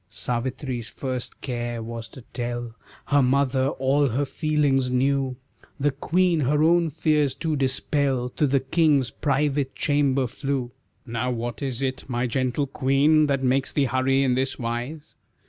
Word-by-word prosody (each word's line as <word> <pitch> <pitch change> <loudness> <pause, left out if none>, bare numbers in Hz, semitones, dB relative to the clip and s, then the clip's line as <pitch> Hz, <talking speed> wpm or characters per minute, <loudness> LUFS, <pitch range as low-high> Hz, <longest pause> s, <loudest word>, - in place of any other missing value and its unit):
Savitri's 125 +1 -3
first 130 -2 -5
care 120 -2 -3
was 115 0 -6
to 130 - -12
tell 120 -1 -4 0.3
Her 145 -1 +3
mother 130 0 +2
all 140 +1 +1
her 135 +5 0
feelings 145 -4 +1
new; 135 +1 +1 0.4
The 145 +1 +2
queen 170 +5 +1
her 150 +2 +2
own 170 0 +4
fears 150 -2 +1
to 160 -1 -1
dispel 135 -1 0
To 145 +4 0
the 135 0 +2
king's 140 -2 +2
private 140 -1 0
chamber 140 -2 +2
flew. 130 0 -3 0.3
"Now 120 +1 -2
what 120 -3 -4
is 135 -1 -2
it, 130 -1 -2
my 120 -1 -1
gentle 130 +3 0
queen, 140 +3 +3
That 135 -2 0
makes 130 +1 +1
thee 145 - +2
hurry 130 +2 +2
in 130 -2 +2
this 130 +1 -1
wise?" 125 +6 -5
135 Hz, 150 wpm, -24 LUFS, 125-145 Hz, 0.4 s, own